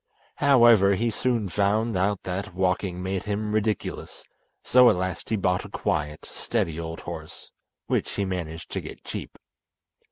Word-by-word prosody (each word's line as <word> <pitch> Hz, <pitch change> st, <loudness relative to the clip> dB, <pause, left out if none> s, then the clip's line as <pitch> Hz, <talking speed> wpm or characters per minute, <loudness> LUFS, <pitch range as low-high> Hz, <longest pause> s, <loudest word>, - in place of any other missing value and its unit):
However, 120 Hz, -8 st, +6 dB
he 115 Hz, +4 st, 0 dB
soon 115 Hz, -2 st, 0 dB
found 105 Hz, +4 st, +1 dB
out 95 Hz, +2 st, 0 dB
that 95 Hz, +1 st, -4 dB
walking 90 Hz, 0 st, 0 dB
made 95 Hz, +1 st, -2 dB
him 105 Hz, 0 st, -2 dB
ridiculous, 110 Hz, 0 st, -2 dB, 0.4 s
so 125 Hz, -1 st, +6 dB
at -, -, +3 dB
last 95 Hz, 0 st, -3 dB
he 110 Hz, -, +1 dB
bought 90 Hz, -3 st, +1 dB
a 105 Hz, -, -10 dB
quiet, 75 Hz, -7 st, -2 dB
steady 80 Hz, 0 st, -2 dB
old 80 Hz, 0 st, -5 dB
horse, -, -, -8 dB, 0.3 s
which -, -, 0 dB
he 100 Hz, -, 0 dB
managed 85 Hz, -3 st, -5 dB
to -, -, -2 dB
get -, -, -10 dB
cheap. -, -, -7 dB
100 Hz, 155 wpm, -26 LUFS, 90-110 Hz, 0.4 s, However